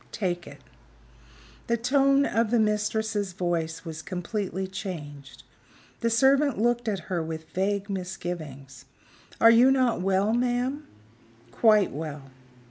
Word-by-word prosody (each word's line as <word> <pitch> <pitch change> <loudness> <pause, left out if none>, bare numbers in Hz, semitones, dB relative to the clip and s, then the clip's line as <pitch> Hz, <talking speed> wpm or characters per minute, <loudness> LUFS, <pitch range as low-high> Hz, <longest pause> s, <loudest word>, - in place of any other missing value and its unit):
"Take 175 -5 -3
it." 145 -1 -12 1.1
The 235 - +1
tone 275 +3 +3
of 230 -2 +1
the 240 - +2
mistress's 210 -2 0
voice 170 -2 -2
was 160 -1 -6
completely 190 +1 -4
changed. 155 -8 -8 0.6
The 230 - 0
servant 270 +3 +3
looked 240 +2 +1
at 200 -4 -1
her 175 0 -3
with 160 0 -6
vague 200 +1 -1
misgivings. 165 - -6 0.5
"Are 230 - +8
you 240 +3 +6
not 255 -7 +2
well, 195 +3 +1
ma'am?" 250 +4 -1 0.6
"Quite 215 - +4
well." 145 -2 -7
200 Hz, 125 wpm, -26 LUFS, 170-230 Hz, 1.1 s, Are